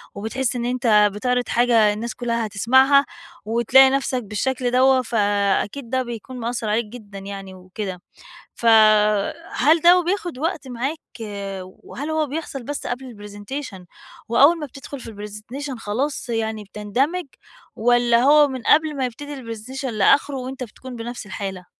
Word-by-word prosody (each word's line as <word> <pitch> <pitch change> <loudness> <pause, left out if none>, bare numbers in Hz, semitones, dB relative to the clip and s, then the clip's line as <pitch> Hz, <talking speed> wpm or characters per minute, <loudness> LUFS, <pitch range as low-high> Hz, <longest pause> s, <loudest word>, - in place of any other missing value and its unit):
وبتحس 245 +5 -2
إن 240 0 -2
أنتَ 225 -4 +3
بتعرض 250 +3 -1
حاجة 230 -3 +4
الناس 230 +3 -5
كلها 235 -2 -1
هتسمعها، 260 +7 +4 0.4
وتلاقي 240 +4 +5
نفسك 265 -2 -1
بالشكل 245 +4 -2
دَوَّة، 260 +1 +4
فأكيد 205 +2 0
ده 260 0 0
بيكون 240 +2 -8
مأثر 230 -2 -3
عليك 220 +2 +1
جدًا 210 -3 -10
يعني 195 -1 -8
وكده. 185 0 -7 0.5
فَهل 215 +7 +3
دَوَّة 355 +1 +6
بياخد 350 -5 -2
وقت 315 -2 -3
معاك؟ 260 +6 -3 0.7
وهل 265 +10 -9
هو 315 -1 0
بيحصل 280 -3 -5
بس 290 +3 -5
قبل 250 -1 -5
الPresentation 205 -1 -7 0.5
وأول 285 +8 +5
ما 300 - -4
بتدخل 275 +1 -9
في 230 - -9
الPresentation 220 +7 -7
خلاص 245 +5 -3
يعني 220 -2 -2
بتندمج؟ 255 - -2 0.5
والًّا 240 +1 +3
هو 295 +1 +6
من 260 -2 -5
قبل 305 +2 +3
ما 260 - 0
يبتدي 290 +4 -7
الPresentation 250 +2 -7
لآخره 260 +5 +2
وأنتَ 255 0 -5
بتكون 250 +2 -10
بنفس 235 -1 -6
الحالة؟ 190 -2 -6
245 Hz, 140 wpm, -22 LUFS, 210-270 Hz, 0.7 s, دَوَّة